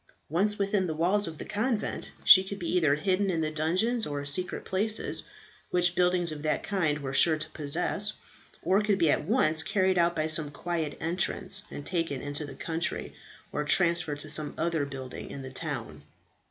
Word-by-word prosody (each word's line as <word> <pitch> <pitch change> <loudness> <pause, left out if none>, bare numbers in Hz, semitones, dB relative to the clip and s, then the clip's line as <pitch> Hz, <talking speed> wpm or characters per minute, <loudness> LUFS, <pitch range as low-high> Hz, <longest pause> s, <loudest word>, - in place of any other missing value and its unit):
Once 200 +7 +1
within 200 -1 0
the 160 - -3
walls 185 +5 +2
of 160 -1 -7
the - - -7
convent, 215 +2 -2 0.2
she 190 - +10
could 195 +1 -6
be 175 - -5
either 155 -5 +3
hidden 190 +5 0
in 165 -3 0
the 155 -1 -1
dungeons 185 +10 0
or 145 -1 -4
secret 165 +6 0
places, 210 +3 0 0.5
which 175 0 +3
buildings 180 -1 +2
of 150 -1 -6
that 155 0 -1
kind 170 -8 0
were 135 -2 -5
sure 155 +3 +5
to 155 - -5
possess, 180 +8 +1 0.5
or 195 +3 +3
could 210 -2 +1
be 165 -4 +3
at 150 - 0
once 160 -7 +2
carried 190 +1 +1
out 170 0 +2
by 155 - 0
some 155 -1 0
quiet 160 +1 -4
entrance, 180 +3 -1
and 145 - -8
taken 165 -6 -2
into 145 +2 -4
the 135 - -9
country, 165 0 -3 0.4
or 150 - -2
transferred 170 -1 +2
to 150 - -5
some 150 0 +1
other 165 -3 0
building 135 -2 -8
in 140 - -7
the 130 - -8
town. - - -5
170 Hz, 190 wpm, -28 LUFS, 150-190 Hz, 0.5 s, she